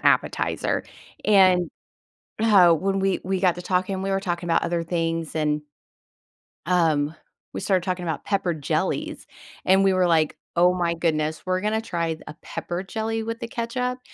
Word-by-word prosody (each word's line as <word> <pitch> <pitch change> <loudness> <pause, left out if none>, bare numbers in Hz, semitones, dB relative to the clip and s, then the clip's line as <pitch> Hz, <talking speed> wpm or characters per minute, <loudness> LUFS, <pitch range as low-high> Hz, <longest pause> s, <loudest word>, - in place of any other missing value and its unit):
appetizer. - - +1 0.4
And, 185 -4 +5 0.7
uh, 200 -6 +6
when 195 +4 0
we 195 -1 +1
we 190 0 0
got 180 -2 +3
to 180 - -6
talking, 185 +1 -1
we 195 - -2
were 195 - +1
talking 175 -2 -3
about 165 - +2
other 170 0 -1
things, 165 -2 -2
and 150 -1 0 1.0
um, 160 -4 +2 0.4
we - - -4
started 185 -3 +1
talking 180 -1 -2
about 160 - -3
pepper 180 -6 -1
jellies, - - -2 0.4
and 190 +1 +5
we 195 -1 +4
were 185 -1 +3
like, 160 -2 +2 0.2
"Oh 180 +1 +5
my 170 -2 0
goodness. 155 -2 -1
We're 185 0 0
gonna 215 +1 0
try 170 -6 -2
a 150 - -8
pepper 175 +2 -5
jelly 220 +3 -3
with 230 +1 -4
the 235 - -5
ketchup 250 +2 -3
180 Hz, 165 wpm, -24 LUFS, 165-195 Hz, 1.0 s, uh